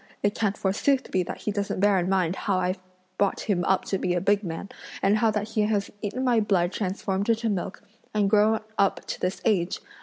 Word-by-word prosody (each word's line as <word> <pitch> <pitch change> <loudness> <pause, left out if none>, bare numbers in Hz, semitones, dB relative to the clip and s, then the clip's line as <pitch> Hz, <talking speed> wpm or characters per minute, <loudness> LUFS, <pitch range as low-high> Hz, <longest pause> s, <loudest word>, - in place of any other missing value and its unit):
It 205 0 +2
can't 205 -3 -1
forsooth 240 +8 +1
be 185 - +2
that 175 - -5
he 210 - -1
doesn't 200 -2 -2
bear 200 -1 +4
in 180 +1 -1
mind 185 -2 +1
how 195 - -1
that 185 - 0
I've 185 +1 -1 0.4
brought 200 -1 +1
him 185 -4 0
up 190 - +2
to 195 - -1
be 180 - 0
a - - +2
big 200 +3 +2
man, 170 +2 -5 0.3
and 200 +2 +4
how 230 -1 +4
that 210 0 -2
he 220 -1 0
has 210 -1 0
eaten 235 +5 -3
my 245 -3 +3
blood 190 -4 +2
transformed 195 +1 -2
into 230 0 +2
milk 195 -1 -3 0.3
and 210 -2 +2
grown 215 +2 +4 0.2
up 200 -1 +2
to - - -5
this 180 +1 -1
age! 185 -5 +2
200 Hz, 230 wpm, -26 LUFS, 190-215 Hz, 0.4 s, bear